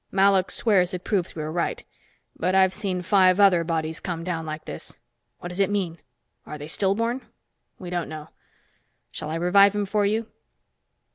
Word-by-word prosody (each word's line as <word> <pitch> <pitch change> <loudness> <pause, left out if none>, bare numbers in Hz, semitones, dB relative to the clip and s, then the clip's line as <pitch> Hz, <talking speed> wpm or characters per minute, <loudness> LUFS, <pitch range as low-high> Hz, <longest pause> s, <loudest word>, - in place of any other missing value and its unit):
Malok 195 -1 +3
swears 185 -5 +2
it 180 - -7
proves 190 -5 -1
we 155 - -4
are 155 - -4
right. 170 +1 -2 0.5
But 185 +2 0
I've 190 -1 +4
seen 185 -2 -3
five 185 0 +4
other 190 -4 +5
bodies 160 -1 -2
come 170 -3 -4
down 165 -2 -3
like 155 0 -6
this. - - -7 0.4
What 175 - -7
does 180 +2 -7
it 195 - +3
mean? 185 -5 -2 0.4
Are 150 - -8
they 145 0 -8
stillborn? 225 +9 0 0.6
We 180 -2 -8
don't 175 -1 -2
know. 155 0 -8 0.8
Shall 150 - -5
I 160 - -3
revive 200 +4 +5
him 205 -1 0
for 205 +1 0
you?" 215 +3 0
185 Hz, 180 wpm, -24 LUFS, 165-200 Hz, 0.8 s, other